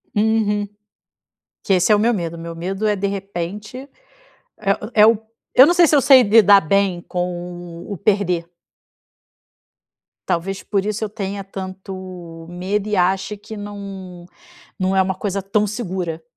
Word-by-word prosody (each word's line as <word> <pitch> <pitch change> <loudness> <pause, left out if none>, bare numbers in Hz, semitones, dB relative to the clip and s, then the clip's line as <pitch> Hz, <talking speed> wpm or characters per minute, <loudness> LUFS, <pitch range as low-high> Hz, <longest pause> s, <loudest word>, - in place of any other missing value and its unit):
Uhum. 210 -1 +1 1.0
Que 195 - +1
esse 185 +3 +3
é - - +7
o 205 - +1
meu 235 +3 +3
medo, 170 -4 -3
meu 165 0 -7
medo 190 +5 -2
é 210 - +2
de 200 0 -1
repente, 200 +3 -5 0.8
é 210 +2 +1
é - - +9
o 225 -1 +4 0.4
eu 260 - +9
não 345 - +3
sei 350 -1 +6
se 300 - +4
eu - - +5
sei 265 -1 +7
lidar 205 -2 +6
bem 190 +1 +1
com 175 -1 -5
o - - -5
o - - -3
perder 195 -5 +1 1.8
talvez 190 +2 -2
por 200 -1 -1
isso 215 +1 -2
eu 215 - -2
tenha 200 -1 -5
tanto 185 -3 -8
medo 195 +4 -2
e 210 - 0
ache 190 +3 +1
que 210 +1 -10
não 195 -3 -8 0.5
não 190 0 0
é 190 - +5
uma 190 0 -1
coisa 195 +1 -3
tão 205 +2 +1
segura. 185 -6 -4
195 Hz, 160 wpm, -20 LUFS, 180-210 Hz, 1.8 s, é